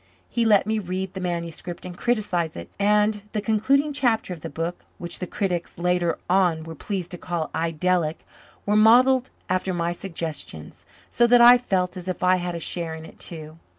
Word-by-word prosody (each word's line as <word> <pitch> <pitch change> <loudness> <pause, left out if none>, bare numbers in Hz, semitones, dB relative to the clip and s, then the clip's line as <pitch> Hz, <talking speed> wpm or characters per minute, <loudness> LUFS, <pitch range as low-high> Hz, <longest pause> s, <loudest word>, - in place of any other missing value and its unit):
He 235 -1 0
let 210 -3 +5
me 220 +1 0
read 185 -1 -4
the 190 - -5
manuscript 175 -1 -4
and 180 -1 -7
criticize 185 -7 -1
it; 85 - -8
and 210 +1 +2
the 215 - 0
concluding 260 +8 +2
chapter 230 -8 0
of 165 - -10
the 165 - -6
book, 165 +2 -4
which 175 -1 -6
the 180 - -4
critics 180 -4 -3
later 175 -1 +1
on 180 -3 +2
were 165 0 -8
pleased 185 +2 -4
to 175 - -6
call 170 -3 -3
idyllic, 165 0 0 0.4
was 210 +1 +3
modelled 250 +4 +5 0.2
after 185 0 -1
my 170 0 0
suggestions, 165 - -7 0.2
so 240 - +4
that 245 0 +6
I 240 +1 +9
felt 185 -7 -1
as 180 0 -8
if 185 - -3
I 185 0 +4
had 175 -1 -3
a - - -4
share 165 0 -3
in 160 0 -9
it - - -15
too. 155 -1 -8
180 Hz, 190 wpm, -24 LUFS, 170-210 Hz, 0.4 s, I